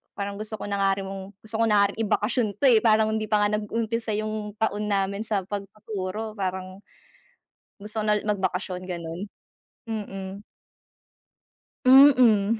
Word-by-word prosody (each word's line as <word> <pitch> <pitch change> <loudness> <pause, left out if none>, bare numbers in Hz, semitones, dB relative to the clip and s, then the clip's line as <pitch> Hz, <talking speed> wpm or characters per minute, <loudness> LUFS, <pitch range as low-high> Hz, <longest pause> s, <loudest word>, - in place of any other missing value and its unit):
parang 200 0 -4
gusto 215 +1 -5
ko - - -5
na 200 0 -1
nga 195 0 +3
ri - - -4
mong 195 0 -8
gusto 220 0 -5
ko - - +4
na 210 -2 +5
nga - - +3
rin 215 - -13
ibakasyon 215 +3 +1
'to, - - +1
eh. 225 - +6
Parang 220 -1 +4
hindi 215 0 -2
pa 210 -1 +2
nga 210 +1 +1
nag-umpisa, 225 +1 -2
yung 215 -1 -4
taon 210 -1 0
namin 200 +1 0
sa 205 -3 0
pagtuturo 205 +1 -5
parang 185 -1 -4 1.0
gusto 215 +2 -5
ko - - -4
na 210 0 +3
ulit 215 - -7
magbakasyon, 185 -2 -1
ganun. 170 +2 -5 0.6
Mm. 195 -3 -5 1.4
Mm. 250 -6 +6
210 Hz, 160 wpm, -25 LUFS, 195-220 Hz, 1.4 s, eh